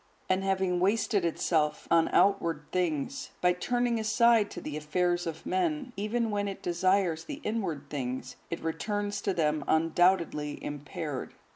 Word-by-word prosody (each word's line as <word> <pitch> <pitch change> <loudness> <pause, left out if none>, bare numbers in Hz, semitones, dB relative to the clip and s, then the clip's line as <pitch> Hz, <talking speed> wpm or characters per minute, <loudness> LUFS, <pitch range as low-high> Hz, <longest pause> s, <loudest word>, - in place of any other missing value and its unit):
And 185 +1 +1
having 190 -2 +1
wasted 200 +1 +2
itself 155 -2 0
on 165 -1 +5
outward 170 -7 +2
things, 180 - -1
by 180 0 +4
turning 240 +5 0
aside 220 0 +4
to - - -7
the 150 - -6
affairs 175 +3 0
of 160 -1 -6
many 370 -2 +2
men, 265 -5 -9
even 220 +3 -1
when 205 0 0
it 195 - -6
desires 180 -1 +1
the 290 -1 -6
inward 195 -10 -2
things, 130 -3 -4
it 170 - -5
returns 205 +5 -2
to 200 - 0
them 150 -2 +1
undoubtedly 165 -2 +2
impaired. 145 0 -5
180 Hz, 150 wpm, -29 LUFS, 160-205 Hz, -, on